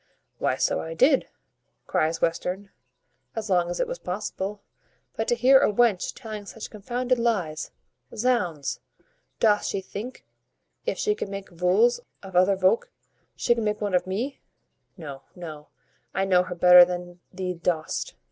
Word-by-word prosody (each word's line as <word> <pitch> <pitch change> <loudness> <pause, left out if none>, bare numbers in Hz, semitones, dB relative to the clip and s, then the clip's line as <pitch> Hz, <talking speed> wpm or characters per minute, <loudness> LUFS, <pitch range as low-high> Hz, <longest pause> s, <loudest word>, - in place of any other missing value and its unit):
"Why, - - +1
so - - +1
I 165 0 -6
did," 270 - +4 0.6
cries 160 +1 0
Western, 180 +4 -1 0.6
"as 220 -2 -4
long 175 -1 +3
as 175 - -3
it - - +1
was - - -5
possible; 200 +1 -4 0.5
but 225 - -2
to 240 - +3
hear 260 +3 +6
a - - +3
wench 215 -3 +2
telling 215 -4 -7
such 225 - -8
confounded 245 +4 -1
lies 185 -10 -1 0.5
Zounds! 205 - 0 0.6
doth 210 -2 +4
she 195 - -1
think, 210 +6 -8 0.6
if - - 0
she 425 - +1
can 315 - -5
make 195 -1 -7
vools 185 +8 +3 0.2
of 190 -2 -10
other 185 +2 +5
volk, 190 +4 +2 0.5
she 240 - +2
can 230 -1 -2
make 210 0 0
one 205 -2 -2
of 180 0 +2
me? 235 +9 -3 0.6
No, 140 -6 -8
no, 155 -4 -8 0.5
I 195 +1 +1
know 185 -2 +4
her 180 - -5
better 180 0 +9
than 175 0 -4
thee 185 -1 -3
dost." 165 -2 -2
195 Hz, 155 wpm, -26 LUFS, 180-225 Hz, 0.6 s, better